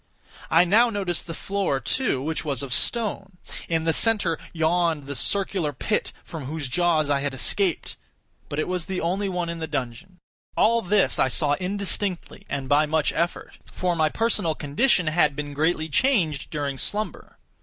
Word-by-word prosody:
I 165 +2 +6
now 220 +7 +4
noticed 195 -7 -2
the 165 - -5
floor, 195 -8 -1
too, 135 - 0
which 160 +2 -2
was 140 -4 -2
of 130 -3 -4
stone. 200 - 0 0.3
In 165 -1 +1
the 165 0 +2
centre 205 -5 +2
yawned 165 -2 +1
the 140 - -5
circular 190 -3 +1
pit 210 +10 -1
from 160 -6 -8
whose 150 0 -4
jaws 160 +1 +2
I 145 -1 +1
had 140 -1 -3
escaped; 180 +6 +1 0.5
but 145 - -4
it 155 - 0
was 180 -2 -3
the 190 -1 -2
only 195 +4 -1
one 180 -2 -2
in 170 0 -5
the 160 - -4
dungeon. 145 +5 -5 0.4
All 230 +1 +4
this 205 0 +2
I - - +4
saw 145 +2 +1
indistinctly 190 +1 -3
and 140 -2 -3
by 150 +3 +3
much 155 -1 +1
effort—for 175 +1 -3
my 155 -2 +2
personal 210 -6 0
condition 170 - +2
had 155 -2 +2
been 145 0 -5
greatly 155 +2 0
changed 160 - +1
during 145 -4 -3
slumber. 210 - -3
165 Hz, 170 wpm, -24 LUFS, 145-195 Hz, 0.5 s, I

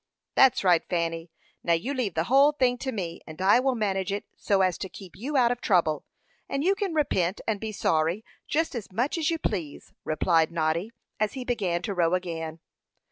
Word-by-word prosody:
"That's 265 -5 +5
right, 175 -3 +5
Fanny. 165 -1 -2 0.3
Now, 170 - +2
you 230 +12 -1
leave 240 - -2
the 160 - +1
whole 275 - +5
thing 250 -4 +1
to 265 - -3
me, 175 -7 -5
and 155 +1 -10
I 195 +5 +5
will 260 0 +1
manage 195 -4 -1
it 200 - -3
so 200 -2 +1
as 185 -2 +1
to 190 - -4
keep 185 +1 -12
you 280 +7 -2
out 240 -2 +4
of 245 - -3
trouble; 165 -7 +2 0.4
and 275 +1 -1
you 380 +4 +4
can 395 -4 -3
repent 190 - +1
and 215 -3 0
be 220 +1 -4
sorry 165 +1 0 0.2
just 320 +2 0
as 225 -6 -6
much 245 - 0
as 315 - +1
you 330 - 0
please," 160 - -4
replied 160 +1 +2
Noddy, 165 +4 0 0.3
as 215 -1 0
he 260 -2 -5
began 190 -8 -1
to 200 - -2
row 175 -1 +2
again. 165 -3 -4
195 Hz, 205 wpm, -27 LUFS, 170-250 Hz, 0.4 s, That's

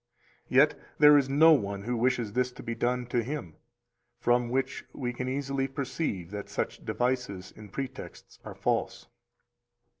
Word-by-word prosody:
Yet 140 +4 +4 0.2
there 150 0 +8
is 140 -2 +3
no 155 +4 +7
one 100 -7 -1
who 120 +3 -1
wishes 120 -3 0
this 125 +1 +1
to - - -10
be 115 - -3
done 125 +2 0
to 120 0 0
him; 115 - -5 0.6
from 120 0 +2
which 130 +1 -1
we 125 -2 -3
can 125 +1 -3
easily 135 0 -1
perceive 135 - -3
that 105 -1 -6
such - - -3
devices 110 -4 -2
and 105 -2 -12
pretexts 135 +2 -7
are - - -8
false. - - -1
125 Hz, 155 wpm, -29 LUFS, 115-135 Hz, 0.6 s, there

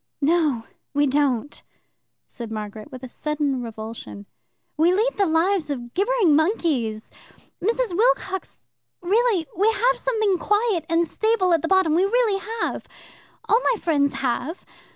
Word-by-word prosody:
"No, 300 -5 +1 0.3
we 290 0 +3
don't," 280 -1 0 0.6
said 235 -3 -9
Margaret, 215 0 -7
with 255 -1 -10
a - - -5
sudden 290 -1 -2
revulsion. 220 -2 -8 0.5
"We 325 +3 +3
lead 440 +7 +1
the 400 -2 +2
lives 330 0 +1
of 240 -4 -5
gibbering 405 -5 +3
monkeys. 290 - 0 0.5
Mrs. 455 -2 0
Wilcox 415 -4 0 0.4
really 410 -1 +2
We 415 +5 +3
have 485 +4 +1
something 435 -7 0
quiet 415 -4 0
and 335 0 +2
stable 435 -2 +1
at 330 - +2
the 330 - -2
bottom. 380 -4 +3
We 345 +4 +3
really 435 -2 +1 0.2
have. - - -3 0.6
All 455 - +4
my - - -10
friends 285 -4 +1
have. 270 +5 -3
330 Hz, 140 wpm, -23 LUFS, 275-410 Hz, 0.6 s, All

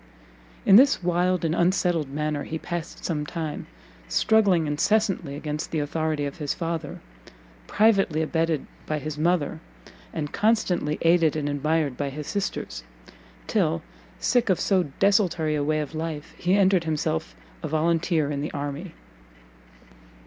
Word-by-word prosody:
In 195 - +8
this 270 -5 +5
wild 180 0 +1
and 160 - +1
unsettled 175 -4 +1
manner 150 +1 -2
he 160 - -4
passed 170 0 -6
some 150 -4 -1
time, 155 0 -5 0.4
struggling 200 - +3
incessantly 170 0 +1
against 150 0 -4
the 160 - -2
authority 155 0 -1
of 140 +4 -6
his 145 -2 -2
father, 165 -3 -4 0.7
privately 195 -7 +3
abetted 160 -2 0 0.2
by 155 - -1
his 150 0 -5
mother, 165 -1 +1 0.5
and 150 -3 -4
constantly 200 -8 +1
aided 165 -2 +4
and 150 -2 -1
admired 145 -1 0
by 140 -1 -2
his 150 +2 -6
sisters: 165 - -3 0.6
till, 80 - 0 0.4
sick 245 -3 +2
of 185 - +3
so 190 -3 +2
desultory 180 -6 +2
a 150 -1 0
way 155 +1 +1
of 150 +1 -6
life, 160 -1 -5
he 180 +2 +1
entered 190 -3 +3
himself 155 - -2 0.3
a - - -3
volunteer 160 -1 +1
in 140 -1 -2
the 150 - -3
army. 145 +4 -5
160 Hz, 140 wpm, -25 LUFS, 150-180 Hz, 0.7 s, In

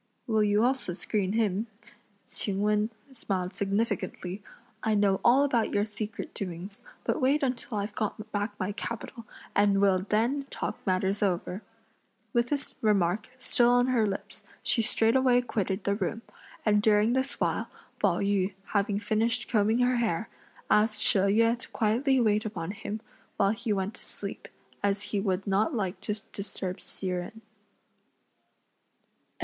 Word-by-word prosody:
"Will 220 -2 +2
you 210 +1 +3
also 255 -7 +1
screen 195 +1 -1
him?" 215 -1 +1 0.6
Ch'ing 200 -1 0
Wen 210 +1 +2 0.2
smiled 190 -6 -2
significantly; 200 -2 -2 0.4
"I 220 -1 +1
know 200 -2 +3
all 255 +4 +6
about 240 -6 +1
your 205 0 +3
secret 215 0 -6
doings, 190 +4 -6 0.2
but - - 0
wait 280 +3 +3
until 250 -3 -1
I've 205 +1 -2
got 215 0 -3
back 205 0 -2
my 185 +2 -1
capital, 230 +2 -6 0.3
and 200 -1 +4
we'll 195 -2 +4
then 230 +8 0
talk - - -4
matters 190 +2 +1
over!" 185 0 0 0.7
With 235 0 +2
this 285 0 -2
remark 205 0 +2
still 240 -2 +3
on 245 +1 +4
her 230 -4 +3
lips, 195 - -5 0.2
she 230 - +2
straightway 245 +3 +4
quitted 200 -5 -2
the 200 - +1
room, 210 +3 -2 0.4
and 210 -1 +4
during 215 +2 +4
this 260 +1 0
while, - - 0 0.3
Pao - - +2
yü 200 -1 +1 0.2
having 200 -1 +2
finished 225 +3 0
combing 220 +1 +2
her 250 0 +3
hair, 225 -3 0 0.4
asked 215 0 +3
She 200 - +4
Yüeh 230 +5 +3
to - - -7
quietly 250 +5 +2
wait 215 -2 +3
upon 185 -5 -4
him, 215 +1 -5 0.4
while 200 -1 +4
he 225 +1 -3
went 195 +1 0
to - - -10
sleep, - - -7 0.3
as 200 0 +1
he 205 - +2
would 195 -1 -1
not 205 +9 +1
like 195 -4 -2
to 210 - -2 0.2
disturb 190 -2 -4
Hsi - - -7
Jen. 180 +4 -4
210 Hz, 155 wpm, -28 LUFS, 200-230 Hz, 0.7 s, all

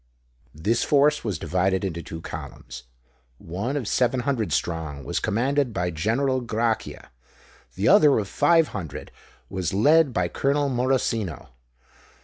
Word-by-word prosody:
This 105 +10 0
force 145 +1 +3
was 105 -7 -2
divided 95 +3 0
into 85 -3 -4
two 80 0 -8
columns: 65 - -9 0.5
one 100 - -4
of 125 -7 -4
seven 125 +2 +1
hundred 120 -5 -1
strong 80 -4 -2
was - - -2
commanded 130 +4 0
by 90 -2 -1
General 125 - 0
Grachia; 115 -1 -2 0.6
the - - 0
other 150 -2 +6
of 105 -3 -1
five 165 - +3
hundred 85 -9 -7 0.4
was 95 -1 -3
led 150 +7 +4
by 90 -6 0
Colonel 140 +8 0
Morosino. 120 - -1
115 Hz, 130 wpm, -24 LUFS, 90-135 Hz, 0.6 s, other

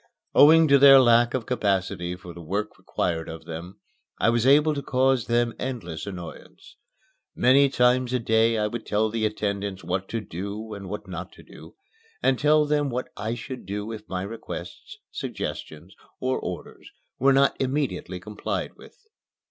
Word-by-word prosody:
Owing 160 +2 +7
to 140 0 +6
their 135 0 +9
lack 120 -1 +4
of 125 -4 -2
capacity 95 -6 -1
for 90 -1 -11
the 85 - -10
work 100 +6 -3
required 80 -2 -2
of 80 0 -9
them, 85 +4 -8 0.4
I 115 - +3
was 120 +1 +1
able 150 +3 +5
to 140 - -3
cause 130 -2 +1
them 120 0 +1
endless 100 -11 -5
annoyance. 90 -4 -10 0.6
Many 135 +2 +5
times 125 -1 +2
a 130 - +2
day 115 -1 +2
I 105 - +1
would 115 +2 -4
tell 105 +1 +1
the 110 -1 0
attendants 100 -2 -3
what 90 +3 -3
to 115 - -2
do 105 +3 -6
and 100 -2 -8
what 105 - -6
not - - -7
to - - -15
do, - - -14 0.5
and 130 - +2
tell 150 +1 +4
them 145 -1 +1
what 125 0 -4
I 110 +3 -3
should 125 -1 -8
do 105 +2 -4
if 110 -1 -9
my 95 0 -3
requests, 115 +4 -8
suggestions, 80 +5 -6 0.3
or 130 0 -1
orders - - -8 0.3
were 135 +2 +4
not 135 0 +4
immediately 130 -10 -2
complied 105 +3 -4
with. - - -16
110 Hz, 170 wpm, -25 LUFS, 95-130 Hz, 0.6 s, their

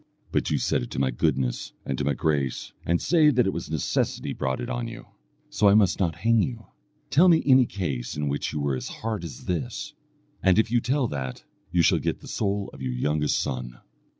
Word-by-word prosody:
But - - 0
you - - +1
set - - +1
it - - -5
to - - -4
my 65 -1 +2
goodness 65 0 -1
and 65 - -1
to - - 0
my 70 0 +1
grace, 70 -1 -1
and 85 0 +2
say 160 -3 +4
that 125 -4 +3
it 95 - 0
was 85 - -5
necessity 80 -3 -1
brought 65 0 -2
it 120 - -4
on 120 -1 -3
you, 115 - -9 0.5
so 105 - +4
I 100 - +6
must 100 -4 +4
not 85 -5 +1
hang 115 +6 +3
you. 115 -2 -3 0.5
Tell 165 +8 +6
me 165 -2 +5
any 130 -3 +6
case 70 -11 -4
in 75 0 -1
which 70 +1 -2
you 75 - -3
were 70 -2 0
as 65 - -5
hard 110 -4 -4
as 75 -7 -8
this, 125 - -3 0.5
and 95 0 +4
if 110 0 +3
you 120 -1 +3
tell 130 +2 +1
that, 65 -3 -5 0.3
you 85 -1 +3
shall - - +4
get - - -2
the - - -11
soul 100 -1 -2
of - - -11
your 65 -1 -2
youngest 75 +4 0
son." 60 -2 -4
85 Hz, 225 wpm, -26 LUFS, -, 0.5 s, I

